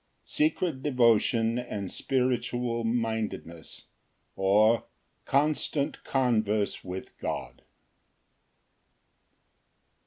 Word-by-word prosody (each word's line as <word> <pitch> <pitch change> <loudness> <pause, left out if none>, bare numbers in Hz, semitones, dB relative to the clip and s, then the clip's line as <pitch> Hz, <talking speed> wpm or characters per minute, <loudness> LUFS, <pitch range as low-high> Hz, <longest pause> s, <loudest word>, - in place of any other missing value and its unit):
Secret 185 - 0
devotion 115 -3 +3
and 105 -6 -5
spiritual 125 -2 0
mindedness; 110 -8 -3 0.5
or, 105 +4 +3 0.4
Constant 145 0 0
converse 110 -6 +1
with 95 0 -7
God. - - -5
115 Hz, 60 wpm, -28 LUFS, 110-130 Hz, 0.5 s, devotion